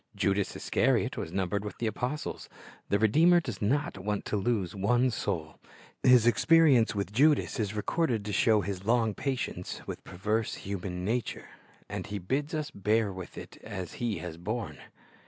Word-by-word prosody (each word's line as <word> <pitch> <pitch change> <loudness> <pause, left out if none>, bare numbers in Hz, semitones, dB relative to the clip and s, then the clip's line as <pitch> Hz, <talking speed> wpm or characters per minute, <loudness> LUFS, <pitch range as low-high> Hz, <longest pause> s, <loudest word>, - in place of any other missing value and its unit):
Judas 100 0 0
Iscariot - - +1
was 80 - -5
numbered 95 +2 -1
with 105 - -6
the 120 - -2
apostles. 125 +7 -3 0.4
The 100 - +3
Redeemer 160 - +5
does 120 - -6
not 130 0 0
want 105 +1 -2
to - - -2
lose 100 -3 0
one 120 +6 +2
soul; 85 -8 -3 0.4
His 125 -3 +6
experience 125 0 +5
with 100 -2 -2
Judas 145 +3 +3
is 105 -1 -1
recorded 115 0 0
to 105 - -3
show 110 +2 +4
His 95 0 -4
long 115 0 +2
patience 130 +3 -3
with - - -7
perverse 105 +5 -2
human 90 -2 -5
nature; 120 +3 -2 0.4
and - - -5
He 105 - -4
bids 140 - -2
us 150 -1 -3
bear 105 -2 +1
with 95 -1 -9
it - - -9
as 95 -5 -6
He 115 -5 0
has 80 -1 -6
borne. 105 +5 -4
105 Hz, 165 wpm, -29 LUFS, 100-125 Hz, 0.4 s, His